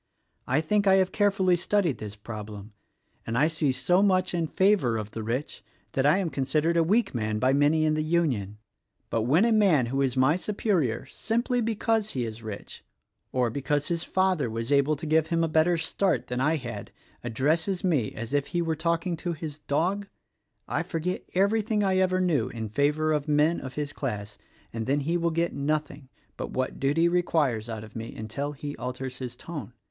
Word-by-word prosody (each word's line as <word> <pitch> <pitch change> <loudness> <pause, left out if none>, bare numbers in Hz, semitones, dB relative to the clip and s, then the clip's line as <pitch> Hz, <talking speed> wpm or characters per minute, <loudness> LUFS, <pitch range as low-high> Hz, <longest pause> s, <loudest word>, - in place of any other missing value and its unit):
I 135 +5 +2
think 200 +5 +1
I 190 - +7
have 190 -1 +3
carefully 195 -3 +3
studied 175 -3 0
this 105 -1 -6
prob 105 0 -7
lem, 105 +1 -10 0.5
and 115 +1 -1
I 150 +4 +4
see 155 -3 0
so 180 +8 +2
much 185 -3 +2
in 170 -2 0
favor 185 - +2
of 105 -1 -5
the 110 - -5
rich 120 +6 -3 0.3
that 135 +1 +2
I 155 +5 +5
am 185 -5 -1
con 135 - -1
sidered 155 +5 +1
a 170 - +4
weak 210 +9 +2
man 110 -3 -1
by 130 +4 +2
many 150 +3 +3
in 155 - +2
the 155 - 0
Union; 145 - 0 0.2
— - - -49
but 115 -1 0
when 165 - +5
a 235 - +3
man 195 - +4
who 135 +4 -1
is 135 -1 0
my 130 +5 +4
superior 180 - 0
simply 235 - -1
because 225 -1 0
he 125 -3 -1
is 110 0 -7
rich, 110 -2 -8 0.5
or 125 -3 +1
because 145 +3 -1
his 170 -1 -1
father 185 -9 +1
was 115 +3 -4
able 140 +2 +3
to 145 - -7
give 155 0 +2
him 165 0 +1
a - - +2
better 160 +2 +3
start 170 +3 0
than 125 +1 -2
I 155 +4 +3
had, 125 -6 -6 0.3
addresses 155 - 0
me 150 - +1
as 115 +3 -5
if 145 -1 +1
he 175 - -1
were 165 -1 -1
talking 170 +2 0
to 170 +2 -3
his 155 -2 -6
dog, 180 +8 -1 0.6
I - - 0
forget 170 +2 -3
everything 210 +2 +2
I 190 -1 +2
ever 185 0 +2
knew 175 -6 +1
in 110 -2 -5
favor 150 +6 +1
of 150 0 -1
men 150 +3 +3
of 130 -1 -7
his 145 -1 -3
class 105 -8 -5 0.3
and 115 -1 -4
then 140 +2 +2
he 165 +5 -1
will 170 -1 +1
get 170 +1 0
nothing 145 -1 -2 0.3
but - - -4
what 130 0 -3
duty 145 +5 +3
requires 155 -10 +1
out 110 -2 -5
of 110 -1 -13
me 115 0 -6
until 125 +7 -4
he 145 0 -6
alters 130 0 -5
his 125 -2 -5
tone. 145 -10 -7
150 Hz, 205 wpm, -27 LUFS, 125-175 Hz, 0.6 s, I